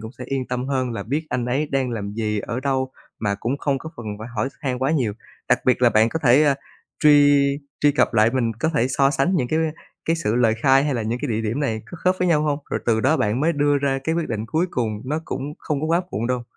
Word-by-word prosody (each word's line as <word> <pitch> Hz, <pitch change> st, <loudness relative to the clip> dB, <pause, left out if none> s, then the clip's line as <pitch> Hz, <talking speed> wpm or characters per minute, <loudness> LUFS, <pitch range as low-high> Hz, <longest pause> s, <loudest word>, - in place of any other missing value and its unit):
cũng 110 Hz, +1 st, -7 dB
sẽ -, -, -6 dB
yên 135 Hz, -2 st, -2 dB
tâm 125 Hz, +1 st, -2 dB
hơn 130 Hz, -3 st, 0 dB
là -, -, -4 dB
biết 150 Hz, +7 st, -2 dB
anh 125 Hz, -1 st, -2 dB
ấy 140 Hz, +5 st, 0 dB
đang 135 Hz, -2 st, 0 dB
làm 100 Hz, -3 st, -4 dB
gì, 105 Hz, -1 st, -1 dB
ở 115 Hz, +4 st, -4 dB
đâu 130 Hz, -1 st, -1 dB, 0.3 s
mà 100 Hz, -2 st, 0 dB
cũng 135 Hz, +5 st, -2 dB
không 140 Hz, -2 st, 0 dB
có 160 Hz, -, -8 dB
phần 120 Hz, -, -8 dB
phải 110 Hz, +2 st, -7 dB
hỏi 105 Hz, +5 st, 0 dB
x -, -, -27 dB
han 130 Hz, -4 st, -2 dB
quá 135 Hz, +3 st, +1 dB
nhiều. 125 Hz, -10 st, +1 dB, 0.4 s
Đặc -, -, +4 dB
biệt 125 Hz, 0 st, +2 dB
là 120 Hz, -, +6 dB
bạn 110 Hz, +2 st, +4 dB
có 160 Hz, -, -2 dB
thể, 130 Hz, +3 st, +6 dB
ờ, 145 Hz, -2 st, +4 dB, 0.5 s
truy 145 Hz, -1 st, +6 dB, 0.4 s
truy 145 Hz, -1 st, +4 dB
cập 135 Hz, -, +1 dB
lại, 110 Hz, +1 st, +5 dB
mình 120 Hz, -3 st, 0 dB
có 160 Hz, -, +2 dB
thể 120 Hz, -1 st, +2 dB
so 135 Hz, +1 st, +3 dB
sánh 145 Hz, +7 st, +1 dB
những 125 Hz, -5 st, 0 dB
cái 160 Hz, -, +1 dB, 0.5 s
cái 165 Hz, +1 st, +1 dB
sự 115 Hz, -9 st, -1 dB
lời 115 Hz, -3 st, +3 dB
khai 135 Hz, +1 st, +5 dB
hay 145 Hz, -3 st, 0 dB
là 115 Hz, -, -1 dB
những 115 Hz, +3 st, -2 dB
cái 145 Hz, -, -1 dB
địa 110 Hz, 0 st, 0 dB
điểm 115 Hz, +6 st, -2 dB
này 110 Hz, -6 st, -1 dB
có 175 Hz, -, -9 dB
khớp 185 Hz, 0 st, +4 dB
với 180 Hz, -1 st, +1 dB
nhau 150 Hz, -3 st, +3 dB
hông, 145 Hz, -1 st, 0 dB
rồi -, -, -1 dB
từ 110 Hz, -1 st, +3 dB
đó -, -, +3 dB
bạn 105 Hz, +5 st, 0 dB
mới 165 Hz, +2 st, +2 dB
đưa 145 Hz, -1 st, +2 dB
ra 135 Hz, -1 st, 0 dB
cái 160 Hz, -, 0 dB
quyết 170 Hz, -2 st, -1 dB
định 110 Hz, -1 st, -3 dB
cuối 160 Hz, +9 st, 0 dB
cùng, 110 Hz, -4 st, -2 dB
nó 150 Hz, +4 st, -2 dB
cũng 145 Hz, +3 st, -5 dB
không 145 Hz, -2 st, -2 dB
có 155 Hz, -, -1 dB
quá 170 Hz, +2 st, +2 dB
muộn 115 Hz, +2 st, -2 dB
đâu. 125 Hz, -1 st, -1 dB
130 Hz, 285 wpm, -22 LUFS, 115-145 Hz, 0.5 s, là